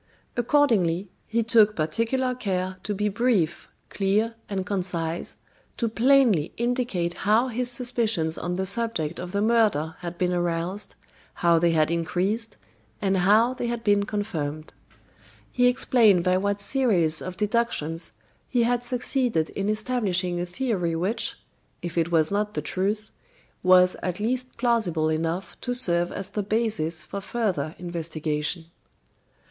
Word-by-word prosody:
Accordingly, 220 - +2 0.2
he 230 +1 0
took 220 -2 +4
particular 230 +11 0
care 185 -5 -2
to 205 +1 -3
be 210 +2 0
brief, 205 -6 0 0.2
clear, 210 +3 +1 0.2
and 190 -2 -2
concise, 175 -4 -2 0.4
to 235 - 0
plainly 230 - +3
indicate 235 -8 -1
how 220 +6 +2
his 245 +1 -1
suspicions 230 -9 0
on 175 +1 -3
the 190 +1 -1
subject 195 -7 -1
of 180 0 -6
the 200 +1 0
murder 215 -9 +2
had 175 0 -6
been 180 0 0
aroused, 175 +3 -2 0.5
how 170 -1 +5
they 170 +1 +3
had 155 -1 +2
increased, 190 +7 -1 0.4
and 195 -2 +1
how 215 +7 +4
they 245 -2 -3
had 235 -1 -3
been 205 -2 +3
confirmed. 160 -8 -4 0.8
He 245 0 +3
explained 230 -7 +4
by 185 0 +3
what 200 +1 -1
series 200 - +2
of 185 0 -6
deductions 205 -7 -1 0.4
he 245 -2 +2
had 245 +1 +1
succeeded 245 - 0
in 200 +1 -2
establishing 205 -6 0
a 175 - -2
theory 180 -5 -1
which, 185 +8 -2 0.5
if 175 -1 -5
it 170 0 0
was 160 0 +3
not 210 +1 -1
the - - -1
truth, 210 +3 -2 0.5
was 180 0 +5
at 180 0 -3
least 255 +4 -1
plausible 220 -10 +1
enough 165 +4 -3
to 245 -1 -2
serve 175 -8 +2
as 195 0 -5
the 210 +1 -2
basis 200 -7 -1
for 200 - -6
further 185 -10 -2
investigation. 165 -2 -3
200 Hz, 140 wpm, -25 LUFS, 170-230 Hz, 0.8 s, how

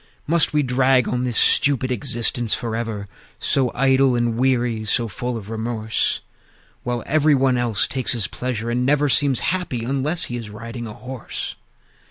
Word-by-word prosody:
Must 165 +1 +2
we 150 -1 +2
drag 130 0 +3
on 125 +1 -1
this 120 -2 -1
stupid 130 -2 +4
existence 120 -3 +1
forever, 115 -4 -4 0.3
So 130 -3 +1
idle 135 0 +3
and 120 -1 0
weary, 120 -3 +1
so 115 +2 +1
full 120 +3 -4
of 105 0 -9
remorse, 110 -1 -1 0.6
While 120 -1 -3
every 155 0 +3
one 130 -1 +2
else 120 -4 +1
takes 130 -2 -1
his 115 -4 0
pleasure, 120 -2 -3
and 125 +1 0
never 145 +2 +2
Seems 135 -1 +3
happy 135 -11 -3
unless 140 +6 0
he 120 - -2
is 115 -3 -7
riding 115 +3 -7
a 105 - -8
horse? 125 -1 -6
125 Hz, 165 wpm, -21 LUFS, 115-135 Hz, 0.6 s, stupid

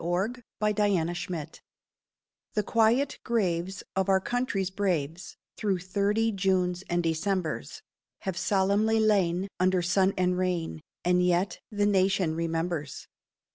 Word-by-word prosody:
MEMORIAL 180 +7 0 0.3
DAY—1892 180 -6 0 1.0
The 210 - +2
quiet 230 +6 +2
graves 190 -5 -1
of 190 0 +1
our 190 0 +5
country's 200 -4 -1
braves 180 -4 -2 0.2
Through 200 -4 0
thirty 200 +5 0
Junes 185 -2 0
and 175 0 +1
Decembers 165 +1 -2 0.4
Have 190 -2 -3
solemnly 205 +4 +2
lain 195 -4 +2
under 185 -1 +2
sun 190 +2 +2
and 180 0 +1
rain, 175 -4 -1 0.2
And 180 0 +3
yet 180 +1 +1
the 205 -1 +1
Nation 190 -4 +2
remembers. 165 -2 -3
185 Hz, 115 wpm, -28 LUFS, 175-205 Hz, 1.0 s, our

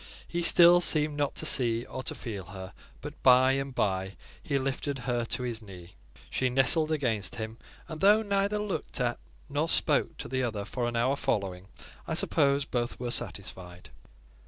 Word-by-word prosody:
He 175 - -3
still 175 +1 +6
seemed 155 -3 +3
not 145 -1 -2
to - - -2
see 120 -2 +2
or - - -7
to - - -3
feel 105 -6 -7
her; 95 0 -10 0.3
but 150 +1 -10
by 130 0 +5
and 135 -1 -3
by, 95 -2 -1 0.3
he 140 - -2
lifted 135 +1 -3
her 120 -2 -2
to 125 - -2
his 120 -2 -4
knee; 90 -4 -13 0.4
she 130 - 0
nestled 135 +5 +5
against 120 -8 -1
him, 110 0 -7 0.3
and 160 -2 -8
though 210 +3 +5
neither 200 0 0
looked 210 -8 -4
at 120 -1 -1 0.3
nor 145 +3 -2
spoke - - +1
to - - -7
the 130 0 -2
other 110 -5 -3
for 120 +2 -3
an 120 - -4
hour 125 +4 +1
following, 100 -9 -3 0.4
I - - -2
suppose 140 0 +2
both 120 -1 -3
were 120 -1 -4
satisfied. 95 -6 -5
125 Hz, 180 wpm, -28 LUFS, 110-145 Hz, 0.4 s, still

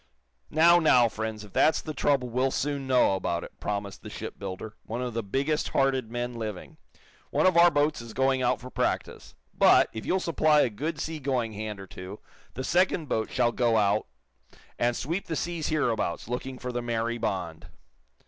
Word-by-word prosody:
"Now, 170 +3 +6
now, 125 -7 +5
friends, 110 -1 -5
if 105 - -14
that's 160 - +4
the 155 - -6
trouble, 135 -3 +1
we'll 125 +3 +1
soon 140 0 -2
know 125 -6 +4
about 85 -2 -2
it," - - -12
promised 100 -1 -4
the - - -9
shipbuilder, 100 +2 -7
one 115 +2 -5
of 125 -2 -3
the 115 - -1
biggest 140 +9 -1
hearted 135 -4 +1
men 120 +1 -3
living. 110 -5 -6 0.5
"One - - +1
of 185 - +4
our 170 +1 +8
boats 145 -3 +1
is 115 -1 -9
going 130 0 +2
out 125 - +1
for 130 +1 -10
practice. - - -2 0.2
But, - - +5
if 110 - -6
you'll 190 - +1
supply 155 -4 +3
a 120 - +1
good 150 +8 -4
sea 160 +1 -4
going 130 -5 -1
hand 105 -1 -5
or 95 - -8
two, 95 +2 -9 0.4
the 130 - -4
second 175 -1 +1
boat 110 - -1
shall 120 - +2
go 120 -2 +2
out 105 0 +2 0.7
and 120 0 +2
sweep 170 +8 -3
the 160 - -2
seas 170 0 -2
hereabouts, 120 - -1
looking 125 +2 -4
for 125 0 -5
the 120 0 -2
'Mary 120 0 -2
Bond.'" 95 -7 -3
125 Hz, 190 wpm, -27 LUFS, 110-145 Hz, 0.7 s, our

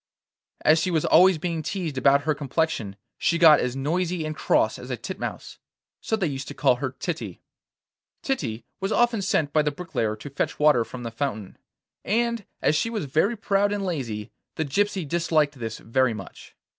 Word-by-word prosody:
As 155 +1 +5
she 170 - 0
was 160 -4 +1
always 185 +1 +6
being 165 0 -2
teased 165 -2 -3
about 140 +2 +4
her 155 - +1
complexion, 140 -7 -2 0.2
she 170 - +2
got 160 -3 +7
as 125 0 -1
noisy 165 +4 -1
and 155 0 -4
cross - - +1
as - - -9
a - - -2
titmouse. - - -6 0.4
So 220 - 0
they 205 -4 -1
used 135 -4 -4
to 145 - -7
call 135 -3 +3
her 130 0 -4
Titty. 170 -3 -4 0.8
Titty 120 - -2
was 195 +2 -2
often 235 -3 +2
sent 155 -6 0
by 155 - +4
the 150 - +1
bricklayer 145 -9 -2
to 135 +6 -10
fetch 140 - -2
water 150 -6 +4
from 125 +2 -9
the 115 - -4
fountain, 115 -5 -4 0.5
and 235 0 0 0.2
as 150 - +3
she 230 - +1
was 215 -8 -3
very 160 - +1
proud 205 -1 +1
and 205 -1 -2
lazy 120 - -4 0.2
the 160 - -1
gypsy 190 +3 0
disliked 155 -3 +1
this 115 -1 -4
very 125 0 +1
much. 95 -3 -11
155 Hz, 185 wpm, -25 LUFS, 130-180 Hz, 0.8 s, got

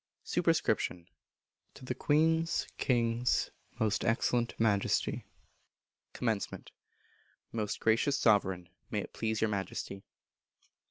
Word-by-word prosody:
Superscription. 85 -1 +1 0.7
To 130 - -11
the - - -1
Queen's 160 +2 +2
(King's) 120 -1 +1 0.3
Most 105 -1 +1
Excellent 120 +1 +1
Majesty. 105 -3 +1 0.8
Commencement. - - -2 0.8
Most 105 -3 -2
Gracious 115 +5 +2
Sovereign; 95 -6 +2 0.2
May - - -1
it - - -9
please 110 -1 -1
your 110 -1 +2
Majesty. 95 0 -4
115 Hz, 95 wpm, -32 LUFS, 105-125 Hz, 0.8 s, Queen's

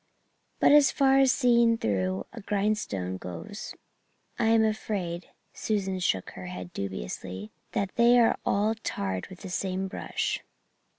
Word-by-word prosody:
But - - +5
as 290 -1 +7
far 270 -1 +4
as 270 -1 +5
seeing 235 -3 +4
through 95 - -1
a 235 - -8
grindstone 195 - -1
goes, 200 - -7 0.6
I 230 - +2
am 225 0 +5
afraid 195 -5 -2
" - - -44
Susan 195 -3 -1
shook 95 - 0
her 90 0 -8
head 90 -1 -7
dubiously, 95 - -5 0.2
"that 195 -2 -1
they 235 +1 +6
are 235 -1 +4
all 210 +2 +2
tarred 95 -2 -3
with 185 - -12
the 190 - -7
same 190 +1 -2
brush." - - -3
195 Hz, 145 wpm, -28 LUFS, -, 0.6 s, as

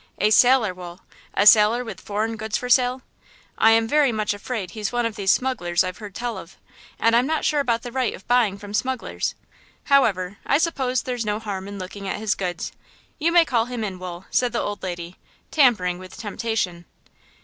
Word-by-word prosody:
"A 210 - +2
sailor, 245 -3 +5
Wool–a 180 +2 -5
sailor 215 +3 +6
with 230 - -8
foreign 215 +2 -2
goods 220 0 -2
for 250 - -5
sale? 250 +1 +3 0.5
I 225 - +5
am 225 0 +3
very 290 0 +3
much 215 -2 -1
afraid 205 -3 -5
he's 210 0 -4
one 240 -1 0
of 230 -2 -2
these 195 -1 +2
smugglers 180 -11 +1
I've 185 +2 -5
heard 205 -3 -9
tell 235 -4 -3
of, 170 - -13 0.4
and 230 0 +3
I'm 245 +3 +3
not 315 0 -1
sure 300 - +2
about 235 -4 0
the 245 - -6
right 255 -2 -1
of 190 - -16
buying 240 -5 +2
from 205 0 -10
smugglers! 255 +3 -2 0.5
However, 200 -9 +2
I 280 - +2
suppose 270 -6 0
there's 245 -2 -3
no 210 -1 -1
harm 200 -3 -5
in 200 0 -7
looking 195 +1 -7
at - - -2
his 215 -1 0
goods. 180 -2 -4 0.5
You 330 +3 +2
may 340 -1 +6
call 235 -6 +1
him 245 -2 -5
in, 190 -3 -4
Wool," 180 0 -7
said 245 -1 +1
the 235 - 0
old 205 -1 -3
lady, 175 -1 -6 0.3
tampering 210 - +3
with 185 0 -11
temptation. 210 -5 -3
220 Hz, 200 wpm, -23 LUFS, 195-245 Hz, 0.5 s, sailor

